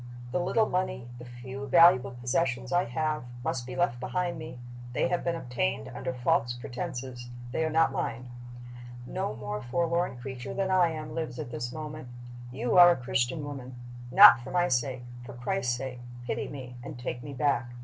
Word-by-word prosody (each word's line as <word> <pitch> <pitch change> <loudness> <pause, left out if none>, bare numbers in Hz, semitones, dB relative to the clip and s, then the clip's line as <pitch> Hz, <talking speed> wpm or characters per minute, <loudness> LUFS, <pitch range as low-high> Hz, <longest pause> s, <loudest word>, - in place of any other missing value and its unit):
The 180 - 0
little 215 +5 +2
money, 180 -10 -2
the 120 - -9
few 130 +2 -7
valuable 165 -4 +6
possessions 125 +1 -1
I 175 - +3
have, 155 +4 -1 0.2
must 125 -1 -2
be 125 - -6
left 130 -5 +1
behind 175 +5 -2
me: 125 -6 -8 0.4
they 150 - +1
have 175 -1 0
been 170 -1 0
obtained 125 - -2
under - - -4
false 120 -1 +1
pretenses; 120 0 -6 0.2
they 160 - 0
are 160 - +1
not 160 -1 +3
mine. 125 -2 -3 0.8
No 110 - -3
more 105 -1 -4
forlorn 170 +4 0
creature 125 0 -6
than 190 -1 0
I 180 -2 +5
am 155 -1 -6
lives 160 -7 -4
at 120 - -5
this 120 +1 -4
moment. 155 -2 -7 0.4
You 125 +7 +2
are 175 0 +11
a 175 - +4
Christian 125 +4 -1
woman. 130 -3 -7 0.4
Not 195 -4 +10
for 135 - -8
my 175 +2 +2
sake 125 0 0 0.2
for 120 - -9
Christ's 125 0 -1
sake 125 -1 -5 0.3
pity - - -2
me 125 -3 -8
and 120 - -8
take 125 0 -4
me 145 +1 -7
back. 130 -3 +1
130 Hz, 180 wpm, -29 LUFS, 120-165 Hz, 0.8 s, are